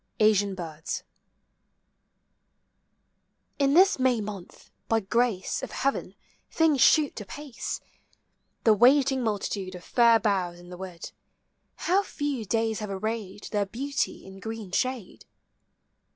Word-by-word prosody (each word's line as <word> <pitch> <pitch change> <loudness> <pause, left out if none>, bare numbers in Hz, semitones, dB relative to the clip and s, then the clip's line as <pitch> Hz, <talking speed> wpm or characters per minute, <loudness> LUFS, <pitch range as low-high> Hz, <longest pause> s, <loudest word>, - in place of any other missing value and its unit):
ASIAN 205 -2 +3
BIRDS. 160 -3 -5 2.6
In 280 0 +3
this 375 -3 +6
May 255 -2 +3
month, 205 -4 -8 0.2
by 225 - +3
grace 220 -1 0
of - - -5
heaven, 275 0 -2 0.3
things 315 -5 +2
shoot 295 -7 +4
apace. 275 +5 -6 0.8
The 220 - +6
waiting 265 +4 +4
multitude 200 -3 -2
of 180 - -10
fair 235 -2 +5
boughs 185 -5 0
in 175 0 -14
the 180 - -9
wood, 180 -2 -8 0.4
— - - -48
How 375 +3 +4
few 290 - -3
days 225 +1 0
have 210 -1 -5
arrayed 205 0 -4
their 205 -2 0
beauty 275 +7 -3
in 190 0 -11
green 220 -3 -6
shade! 255 -1 -2
220 Hz, 125 wpm, -27 LUFS, 195-260 Hz, 2.6 s, this